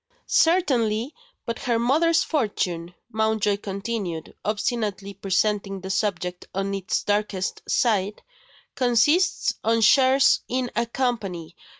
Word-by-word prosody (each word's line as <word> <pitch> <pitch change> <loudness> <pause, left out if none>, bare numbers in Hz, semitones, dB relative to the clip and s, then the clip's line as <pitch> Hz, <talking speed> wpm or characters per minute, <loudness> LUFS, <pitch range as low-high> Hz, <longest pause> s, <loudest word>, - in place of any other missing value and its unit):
"Certainly! 260 -8 +2 0.3
But 230 - -4
her 240 -3 0
mother's 310 +8 +3
fortune," 180 - -2 0.2
Mountjoy 220 -2 +1
continued, 195 -4 -4
obstinately 210 -2 -2
presenting 195 0 -1
the 190 +1 -5
subject 180 -3 -2
on 195 +1 -1
its 195 -2 -2
darkest 205 -2 -1
side, 210 -3 +1 0.5
"consists 260 - +2
of 225 0 +2
shares 265 +4 +5
in 250 0 -1
a 235 +1 0
Company. 200 -10 -3
215 Hz, 105 wpm, -24 LUFS, 195-245 Hz, 0.5 s, shares